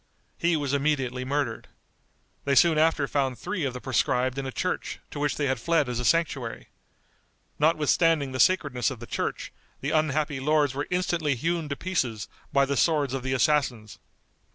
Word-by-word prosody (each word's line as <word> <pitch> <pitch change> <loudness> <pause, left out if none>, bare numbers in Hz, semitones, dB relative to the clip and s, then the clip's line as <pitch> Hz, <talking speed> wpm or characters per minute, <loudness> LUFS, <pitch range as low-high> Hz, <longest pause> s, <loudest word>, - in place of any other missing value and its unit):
He 170 -1 +2
was 145 -2 -2
immediately 135 -3 0
murdered. 135 -3 -2 0.8
They 140 0 +1
soon 160 +1 +5
after 155 -3 +2
found 135 -3 -1
three 175 - -3
of 130 - -2
the - - -4
proscribed 130 +1 0
in 135 - -4
a - - -4
church, 180 +7 -3
to 145 - -6
which 145 -2 0
they 145 - 0
had 130 -2 0
fled 165 +1 +1
as 125 -1 -2
a 125 - -2
sanctuary. 145 -8 0 0.9
Notwithstanding 155 -1 +2
the 130 - -4
sacredness 145 -10 +2
of 130 -4 -7
the 120 - -8
church, - - -4 0.3
the 140 - -3
unhappy 150 -2 0
lords 150 -1 +2
were 145 +2 -3
instantly 175 -5 0
hewn 165 +4 -2
to 140 - -2
pieces 130 - -2 0.2
by 140 0 +4
the 140 +1 -1
swords 145 -2 +2
of 135 - -2
the 130 +1 -2
assassins. 125 - 0
140 Hz, 175 wpm, -26 LUFS, 130-155 Hz, 0.9 s, soon